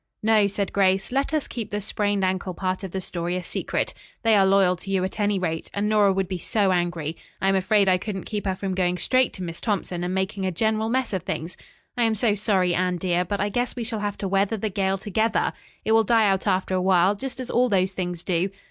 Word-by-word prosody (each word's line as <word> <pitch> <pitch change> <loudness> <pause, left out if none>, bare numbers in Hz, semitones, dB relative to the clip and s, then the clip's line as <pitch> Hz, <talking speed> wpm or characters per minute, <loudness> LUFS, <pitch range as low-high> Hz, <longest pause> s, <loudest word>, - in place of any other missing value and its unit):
"No," 215 -2 +4
said 200 0 -2
Grace. 195 0 +2
"Let 275 +2 0
us 310 -2 0
keep 225 -4 -5
the 205 - -2
sprained 205 -1 0
ankle 185 -1 -2
part 185 +1 -2
of 195 - -4
the 190 - -3
story 175 0 -3
a 180 - -3
secret. - - -2 0.3
They 225 -1 +5
are 195 -1 +5
loyal 190 -2 +4
to 195 - -9
you, 190 -1 +1
at 190 +3 -4
any 205 -1 +2
rate, 165 -3 -3
and 205 +1 0
Nora 210 -2 +4
would 190 -1 0
be 185 -1 -4
so 200 +1 +1
angry. 175 -3 -1 0.2
I 195 - +2
am 195 - +3
afraid 195 +1 +3
I 185 -1 +4
couldn't 195 -1 -4
keep 205 -2 -4
her 190 - 0
from 190 0 -3
going 180 -1 0
straight 255 +8 +2
to 185 - -6
Miss 170 -1 -5
Thompson 185 -5 -2
and 180 - -2
making 190 +1 -2
a 190 - 0
general 220 +4 0
mess 255 -2 0
of 190 - -1
things. 180 -2 -4 0.4
I 245 - -1
am 225 -1 +2
so 220 0 +2
sorry, 195 -4 +1
Anne, 180 0 0
dear, 175 0 +1
but 200 +3 -3
I 205 - 0
guess 245 +4 -1
we 240 - -3
shall 225 -1 -3
have 205 -1 -3
to 195 - -3
weather 195 +3 +1
the 215 +1 -2
gale 190 0 0
together. 220 +3 0 0.3
It 220 - +1
will 225 0 +5
die 225 0 +4
out 195 +1 +1
after 190 -1 +1
a 185 - +1
while, 185 +1 +4
just 260 +5 -6
as 255 - -4
all 250 +1 +3
those 190 -2 +2
things 180 -2 -4
do. 180 +1 0
195 Hz, 255 wpm, -24 LUFS, 185-210 Hz, 0.4 s, They